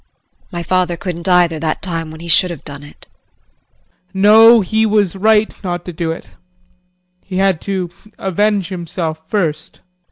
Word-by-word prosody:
My 175 -1 -4
father 180 0 0
couldn't 170 +2 -5
either 175 -3 +3
that 155 0 -3
time 165 -4 -3
when 160 +1 -11
he 170 - -8
should 180 +3 +4
have 170 -4 -8
done 145 -1 -8
it. 145 - -15 1.1
JEAN. 190 - -3
No, 225 +2 +8
he 220 +3 0
was 210 -4 +1
right, 215 +2 +2
not 175 -2 -4
to 180 - -6
do 165 0 -2
it 165 - -8 0.9
he 185 -2 -6
had 190 -3 +1
to 185 -3 -3 0.3
avenge 200 0 0
himself 165 -3 -5
first. 160 -7 -2
180 Hz, 160 wpm, -16 LUFS, 165-200 Hz, 1.1 s, No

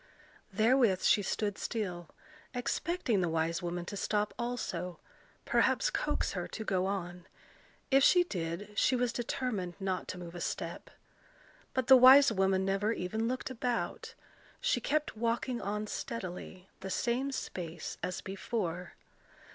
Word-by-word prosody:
Therewith 220 -2 +3
she 205 - +5
stood 205 +1 -2
still, 180 -7 -3 0.5
expecting 245 - 0
the 175 - +1
wise 165 +1 0
woman 175 0 -3
to 200 - -6
stop 210 +1 0
also, 185 -8 -3 0.5
perhaps - - +2
coax - - -1
her - - -3
to 220 - -6
go 190 -1 +1
on: 180 -3 -4 0.6
if 270 0 +6
she 355 +3 +6
did, 180 - -4
she 255 - +3
was 245 -1 0
determined 230 -7 -2
not 190 -2 -2
to 185 - -5
move 175 -1 -8
a 175 - -7
step. - - -4 0.9
But 260 -2 +1
the 265 - +9
wise 260 +1 +9
woman 190 -2 +2
never 195 +3 +1
even 220 +4 -2
looked 255 +1 -3
about: 245 -1 -3 0.4
she - - +1
kept 300 -3 0
walking 235 +2 -1
on 210 +2 -2
steadily, 185 -4 -6
the 190 - -6
same 245 +7 0 0.2
pace 170 -2 -6
as 185 - -3
before. 190 -3 -4
205 Hz, 140 wpm, -32 LUFS, 180-245 Hz, 0.9 s, the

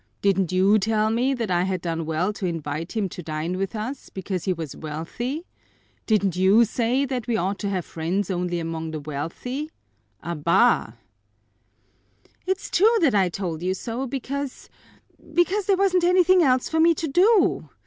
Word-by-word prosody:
"Didn't 195 -3 +2
you 195 +4 +4
tell 215 +1 +1
me 255 +4 +1
that 230 -6 -3
I 175 0 +2
had 185 0 -1
done 165 -2 -3
well 170 +6 0
to 195 -3 -3
invite 165 -1 -4
him 205 -3 +1
to 175 - -8
dine 155 +2 -3
with 195 +2 -3
us, 250 +6 -5
because 190 -2 -4
he 190 - +1
was 165 -5 -5
wealthy? 200 - -5 0.6
Didn't 200 -5 +2
you 195 +5 +5
say 240 +5 0
that 255 -3 -4
we 235 -2 +1
ought 195 +1 -1
to 200 - -2
have 185 -3 -2
friends 175 +5 -2
only 175 -1 -1
among 165 -1 -4
the 155 -1 -4
wealthy? 165 - -5 0.5
Abá!" 170 - +2 1.5
"It's 380 +1 -2
true 445 +6 +4
that 300 -8 +4
I 195 -3 +3
told 170 -3 -4
you 185 +1 -1
so, 240 +6 -4
because 275 +1 -5 0.7
because 370 +3 +2
there 395 -2 +3
wasn't 370 -2 +2
anything 365 +1 +5
else 255 -5 +3
for 320 - -1
me 335 +1 +5
to 320 - -3
do. 360 - +3
200 Hz, 170 wpm, -24 LUFS, 170-270 Hz, 1.5 s, you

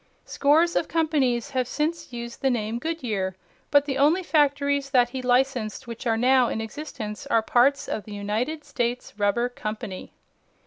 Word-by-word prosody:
Scores 320 +5 +3
of - - +1
companies 285 -6 +1
have 255 -2 0
since 305 +2 -2
used 235 -1 -7
the 270 - +3
name 230 -1 -1
Goodyear, 225 - -2 0.3
but 285 -1 +4
the 270 -2 -2
only 315 +7 +4
factories 285 -3 +2
that 245 -3 +4
he 260 +1 -5
licensed 250 -3 0
which 235 +1 -6
are 225 -1 +2
now 255 +1 +4
in 220 - -2
existence 220 -3 -6
are 225 - +2
parts 265 +5 +3
of 215 - -4
the 210 - -8
United 225 +10 -2
States 245 -2 -3
Rubber 205 +4 +2
Company. 215 -5 -6
250 Hz, 165 wpm, -25 LUFS, 225-285 Hz, 0.3 s, but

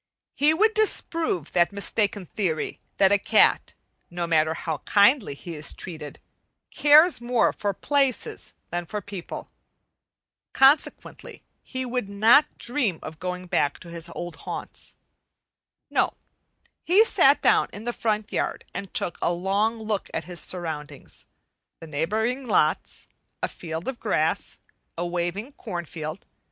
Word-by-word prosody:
He 295 +2 +3
would 430 +7 +3
disprove 330 - 0
that 175 +1 +3
mistaken 200 0 0
theory 170 -4 -2 0.2
that 195 0 +5
a 205 - +5
cat, - - +3 0.3
no 175 0 -3
matter 160 -1 +2
how 160 -3 -3
kindly 205 - +3
he 170 +4 -8
is 150 -2 -2
treated, 155 -5 -8 0.5
cares 300 +1 +6
more 240 -1 +2
for 205 - -1
places 275 +5 -1 0.2
than 175 0 -3
for 210 - -3
people. 200 -3 -8 1.0
Consequently 270 +3 +2 0.2
he 260 -1 -5
would 245 -4 -3
not 225 +9 +4
dream 240 - -1
of 155 -1 -8
going 180 0 -4
back 145 -5 0
to 170 - -10
his 170 0 -7
old 175 -1 -6
haunts. - - -7 1.0
No; - - +1 0.7
he 400 +6 +5
sat - - +5
down - - +3
in 205 - -9
the 240 +1 -2
front 215 -2 -2
yard - - -2
and 195 - -6
took 175 - -2
a - - +2
long 200 +6 0
look 215 -3 -3
at 160 - -2
his 175 +1 -6
surroundings, 155 -5 -6 0.5
the - - -9
neighboring 220 - -1
lots, 165 -5 +1 0.4
a - - +2
field 165 0 -6
of 265 -2 -4
grass, - - 0 0.4
a 175 - -2
waving 175 +8 -3
corn 180 -11 -6
field. 155 +2 -7
195 Hz, 140 wpm, -25 LUFS, 170-240 Hz, 1.0 s, cares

